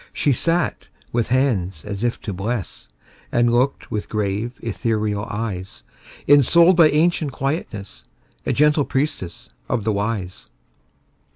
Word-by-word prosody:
She 145 - +1
sat 165 +7 0 0.2
with 115 -1 0
hands 105 - 0
as 100 +1 -5
if 120 -1 0
to 100 - -4
bless, 95 - -4 0.4
And 120 0 +3
looked 130 +3 0
with 105 - -3
grave, 105 +3 -2
ethereal 105 -2 -1
eyes; 95 - -5 0.4
Ensouled 170 +6 +6
by 165 -3 +7
ancient 155 -2 +1
quietness, 110 - -4 0.4
A - - -1
gentle 150 0 +3
priestess 135 - -3 0.2
of 120 -4 0
the 110 0 +1
Wise. 100 -3 -3
115 Hz, 125 wpm, -21 LUFS, 100-140 Hz, 0.4 s, by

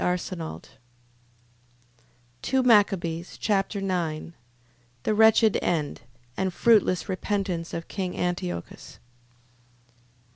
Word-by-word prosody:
2 265 0 +1
Machabees 185 -7 +2
Chapter 200 -1 0
9 170 -4 -2 0.7
The 215 - +1
wretched 220 0 +5
end, 155 -4 -1 0.3
and 190 -1 -1
fruitless 205 -3 +3
repentance 185 -3 -2
of 165 - -5
king 185 -3 -4
Antiochus. 90 - -4
185 Hz, 75 wpm, -26 LUFS, 170-210 Hz, 0.7 s, wretched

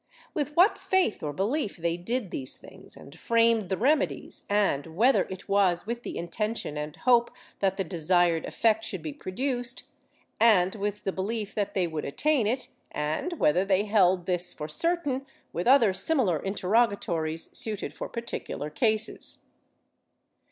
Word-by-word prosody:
With 295 -1 -2
what 370 +5 +5
faith 375 - +1
or 150 - -3
belief 210 - -1
they 170 0 -1
did 210 +4 -3
these 130 -2 -2
things - - -14
and 140 - -13
framed 230 +1 +2
the 190 - 0
remedies, 290 +6 0
and 200 -8 +1
whether 250 +5 +4
it 185 -1 -8
was 195 -3 +2
with 235 +2 -4
the - - -6
intention 210 -1 -3
and 150 0 -5
hope 240 -2 +3 0.3
that 195 -1 +1
the 195 - 0
desired 170 0 +1
effect 220 -1 +1
should 190 -6 -4
be 155 -2 -4
produced, 245 - -3 0.6
and 195 -5 +5
with 210 0 -3
the 195 - -1
belief 210 +2 -3
that 205 -2 -2
they 185 -2 +2
would 160 -3 -4
attain 275 - +1
it, 250 +4 -1 0.2
and 150 - -2
whether 180 - +2
they 195 0 +2
held 190 -4 +3
this 180 -1 +1
for 150 - -6
certain 290 - 0 0.2
— - - -38
with 175 - -2
other 245 -7 +6
similar 190 - +1
interrogatories, 190 -5 0
suited 215 -3 0
for - - -6
particular 230 -9 -5
cases. 220 +6 0
200 Hz, 160 wpm, -27 LUFS, 175-235 Hz, 0.6 s, other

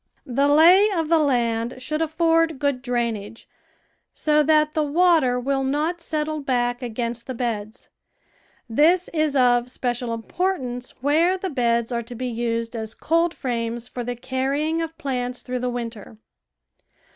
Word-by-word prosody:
The 275 +3 +1
lay 345 +8 +6
of 330 -6 -1
the 330 -1 +4
land 235 -5 0
should 305 +5 -3
afford 325 0 +2
good 280 -2 -1
drain 240 -3 -1
age, 210 +2 -10 0.7
so 300 -1 +2
that 305 0 +3
the 310 - +1
water 300 -4 +3
will 270 +2 -1
not 305 +6 -1
settle 310 -1 -2
back 245 -2 0
against 235 0 -4
the 260 - -4
beds; 225 -1 -4 0.8
this 320 +10 +3
is 310 -3 +1
of 245 -2 +3
special 245 -1 -2
importance 250 0 -3
where 325 +7 +3
the 375 -1 -4
beds 235 -3 0
are 235 -1 -1
to 240 +1 -9
be 255 +2 -4
used 230 -1 -2
as 220 0 -4
coldframes 245 -8 -1
for 245 - -6
the 245 +1 -4
carrying 270 +6 -1
of 325 0 -5
plants 250 -5 -3
through 250 0 -3
the 250 0 -1
winter. 230 - -6
260 Hz, 150 wpm, -23 LUFS, 240-310 Hz, 0.8 s, lay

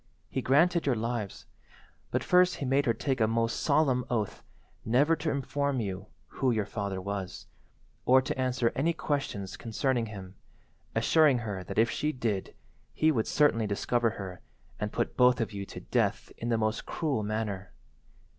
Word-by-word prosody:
He 130 - -1
granted 165 +6 +3
your 130 - +3
lives, 115 -2 -3 0.6
but - - -1
first 180 0 +4
he 140 - -4
made 135 +2 +2
her 115 - +4
take 130 +1 -1
a 110 - +4
most 115 +1 0
solemn 140 -4 +2
oath 110 -5 -2 0.4
never 140 +8 +3
to 155 +1 -2
inform 140 -1 -1
you 95 -2 -4 0.2
who 130 - -1
your 110 -4 +1
father 100 -2 -3
was, 100 -1 -5 0.6
or 130 +1 +6
to 130 - -2
answer 125 -2 +1
any 165 +5 +1
questions 135 - -3
concerning 120 +1 -1
him, 95 -3 -9 0.6
assuring 155 -5 +4
her 95 -3 -4
that - - -7
if 115 +2 +4
she 150 - 0
did 115 -8 -2 0.4
he 155 0 +4
would 115 -7 0
certainly 115 -7 +3
discover 115 +3 +1
her 95 -2 -7 0.4
and 105 0 -2
put 120 - -2
both 125 0 +5
of 115 -2 -2
you 100 -1 -5
to - - -8
death - - 0
in 120 - -4
the 115 - +2
most 110 +1 -1
cruel 145 -9 -1
manner. 105 -2 -3
120 Hz, 170 wpm, -29 LUFS, 105-140 Hz, 0.6 s, or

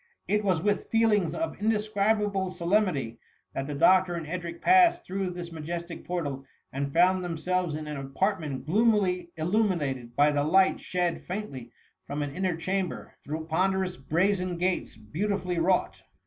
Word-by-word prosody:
It 210 +1 +1
was 185 -5 +1
with 205 0 0
feelings 220 -6 +2
of 325 -9 -3
indescribable 210 -2 +1
solem 185 +4 +2
nity, 130 - -4 0.3
that 135 - -3
the 145 - -4
doctor 180 +3 +4
and 165 -2 -4
Edric 170 +1 -5
passed 365 -2 +5
through 190 0 -2
this 175 -1 -7
majestic 170 +2 -6
portal, 145 -7 -3 0.3
and 140 +1 -2
found 180 +3 +4
themselves 175 -1 -1
in 155 0 -5
an 150 -1 -5
apartment 140 0 -2
gloomily 190 -2 +2
illumined 155 - 0
by 145 +1 +5
the 145 0 +1
light 190 +5 +4
shed 175 -2 -1
faintly 175 - -5 0.4
from 145 +1 -2
an 140 -1 -5
inner 185 -3 -1
chamber, 185 +1 -3
through 160 +2 -4
pcm* 185 +4 +1
derous 185 -6 -4
brazen 180 +1 +1
gates 180 +1 -1
beautifully 180 - -2
wrought. 180 +2 +1
180 Hz, 155 wpm, -28 LUFS, 155-195 Hz, 0.4 s, passed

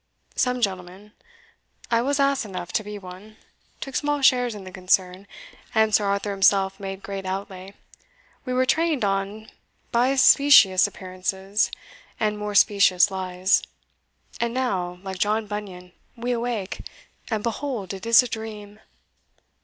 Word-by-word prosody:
Some 250 0 0
gentlemen 190 0 -4 0.8
I 230 0 +3
was 280 +3 0
ass 275 -1 +2
enough 185 -4 -7
to 215 - 0
be 210 0 -7
one 195 +3 -12 0.4
took 270 -2 -7
small 290 -1 -1
shares 245 -3 +3
in 200 - -9
the 185 - -10
concern, 185 +1 0 0.5
and 220 -1 +3
Sir 205 0 +3
Arthur 200 +1 -1
himself 195 0 +2
made 195 0 -7
great 195 -1 -5
outlay; 190 0 -6 0.7
we 255 - -5
were 255 +1 +2
trained 315 -4 +1
on 200 +2 -3 0.4
by 250 +3 +2
specious 260 -8 +6
appearances 190 +2 -2 0.5
and 215 -1 0
more 210 0 -4
specious 200 -2 +4
lies; 185 0 +1 0.8
and 235 +1 -1
now, 185 -9 -2
like 190 -1 -6
John 215 +2 +1
Bunyan, 195 -4 -7 0.2
we 240 +1 -3
awake, 235 -5 -3 0.5
and 220 -3 -2
behold 230 -5 -3
it 195 +3 -8
is 230 +2 +7
a - - -4
dream!" 215 -2 -8
205 Hz, 140 wpm, -24 LUFS, 190-235 Hz, 0.8 s, is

